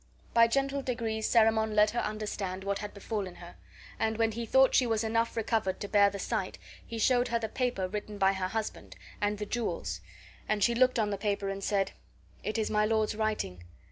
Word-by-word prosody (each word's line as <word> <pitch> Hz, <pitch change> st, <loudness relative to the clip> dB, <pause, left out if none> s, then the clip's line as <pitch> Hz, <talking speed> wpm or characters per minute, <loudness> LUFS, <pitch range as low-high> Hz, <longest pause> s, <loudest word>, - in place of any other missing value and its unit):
By 230 Hz, 0 st, +6 dB
gentle 275 Hz, +3 st, 0 dB
degrees 225 Hz, -4 st, -2 dB
Cerimon 220 Hz, -1 st, +3 dB
let 210 Hz, 0 st, +5 dB
her 235 Hz, -, -1 dB
understand 210 Hz, -3 st, -3 dB
what 200 Hz, 0 st, -1 dB
had 205 Hz, 0 st, -5 dB
befallen 200 Hz, -3 st, -4 dB
her; -, -, -11 dB, 0.5 s
and 220 Hz, 0 st, 0 dB
when 225 Hz, -1 st, +2 dB
he 230 Hz, +1 st, -4 dB
thought 265 Hz, +3 st, +5 dB
she 250 Hz, -, +4 dB
was 225 Hz, -1 st, +1 dB
enough 230 Hz, +1 st, 0 dB
recovered 220 Hz, -4 st, 0 dB
to 205 Hz, -, -4 dB
bear 200 Hz, -1 st, +5 dB
the 200 Hz, -, -6 dB
sight -, -, -2 dB, 0.3 s
he 230 Hz, -, -7 dB
showed 245 Hz, +2 st, +3 dB
her 235 Hz, -, +1 dB
the 225 Hz, -1 st, -2 dB
paper 240 Hz, -5 st, -1 dB
written 210 Hz, +1 st, -5 dB
by 195 Hz, 0 st, +4 dB
her 190 Hz, -1 st, -2 dB
husband, 220 Hz, +2 st, -5 dB, 0.3 s
and 205 Hz, 0 st, +1 dB
the 210 Hz, -, -4 dB
jewels; 170 Hz, -, -3 dB, 0.5 s
and 210 Hz, -2 st, +1 dB
she 235 Hz, -, +4 dB
looked 255 Hz, +1 st, +3 dB
on 210 Hz, -2 st, +1 dB
the 200 Hz, -, -3 dB
paper 200 Hz, -1 st, -1 dB
and 195 Hz, 0 st, -4 dB
said: 195 Hz, -2 st, +1 dB, 0.5 s
"It 215 Hz, -, -2 dB
is 220 Hz, -, -1 dB
my 210 Hz, 0 st, +3 dB
lord's 220 Hz, 0 st, +1 dB
writing. 210 Hz, -, -2 dB
215 Hz, 205 wpm, -30 LUFS, 200-230 Hz, 0.5 s, By